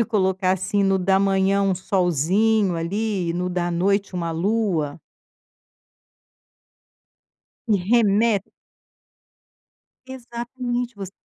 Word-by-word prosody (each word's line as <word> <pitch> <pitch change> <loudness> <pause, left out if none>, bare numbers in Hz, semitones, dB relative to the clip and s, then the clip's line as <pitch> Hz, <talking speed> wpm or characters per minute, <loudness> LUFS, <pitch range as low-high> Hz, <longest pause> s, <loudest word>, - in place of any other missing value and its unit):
pode 230 - +3
colocar, 190 -4 +1
assim, 190 +2 -1
no 195 0 +2
da 190 +1 +2
manhã 195 0 +2
um 195 -1 +2
solzinho, 185 +3 +1
ali, 190 +2 -2
e - - -1
no 180 +1 -2
da 175 -1 -2
noite 195 +2 0
uma 170 -2 -2
lua. 170 -5 -1 2.7
E 210 - +4
reme 220 -2 +3 1.7
Exatamente. 245 -1 -5
Você 195 -1 -7
195 Hz, 100 wpm, -22 LUFS, 180-220 Hz, 2.7 s, E